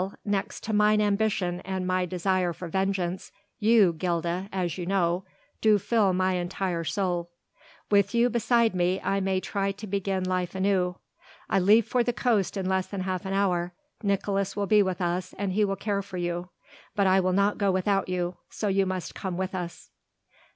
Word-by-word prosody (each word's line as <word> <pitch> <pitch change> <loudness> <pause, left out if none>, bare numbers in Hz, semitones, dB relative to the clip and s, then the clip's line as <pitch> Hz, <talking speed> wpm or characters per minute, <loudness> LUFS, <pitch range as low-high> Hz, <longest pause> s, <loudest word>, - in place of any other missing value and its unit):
next 200 -1 -2
to 220 - -3
mine 210 0 +4
ambition 205 -3 +1
and 190 0 -4
my 185 0 0
desire 180 0 0
for 180 - -7
vengeance, 190 0 -1 0.3
you, 215 -5 +5
Gilda, 175 +2 -2
as 180 -3 -2
you 175 -2 -5
know, 180 -1 +1 0.4
do 215 -1 +5
fill 205 -1 +2
my 185 +1 +1
entire 180 -1 -2
soul. 175 0 -1 0.6
With 200 +3 +3
you 235 +1 +4
beside 235 -1 +2
me 180 +1 +1
I 195 +1 +1
may 190 -1 0
try 195 +1 -1
to 205 +2 -9
begin 195 -1 -1
life 185 -1 -1
anew. 190 -2 +1 0.5
I - - +4
leave 210 +4 +5
for 250 - +1
the 245 - 0
coast 210 -3 +1
in 190 -1 -2
less 190 0 0
than 200 -2 -4
half 185 +1 -3
an 190 - -2
hour; 180 -3 +1 0.3
Nicolaes 200 -1 0
will 200 0 0
be 210 +1 +5
with 185 -2 -1
us 180 +1 -2
and 195 -2 -2
he 210 +2 +2
will 195 -1 0
care 200 0 -1
for 190 -2 -8
you. 175 0 -3 0.5
But 200 - +2
I 190 0 +5
will 185 0 +1
not 200 +2 +2
go 200 -1 +2
without 195 +1 +1
you, 180 -1 -2
so 210 - -2
you 195 0 +2
must 185 -1 -4
come 185 -2 -4
with 190 +1 -2
us." 175 -2 -6
190 Hz, 190 wpm, -27 LUFS, 180-200 Hz, 0.6 s, you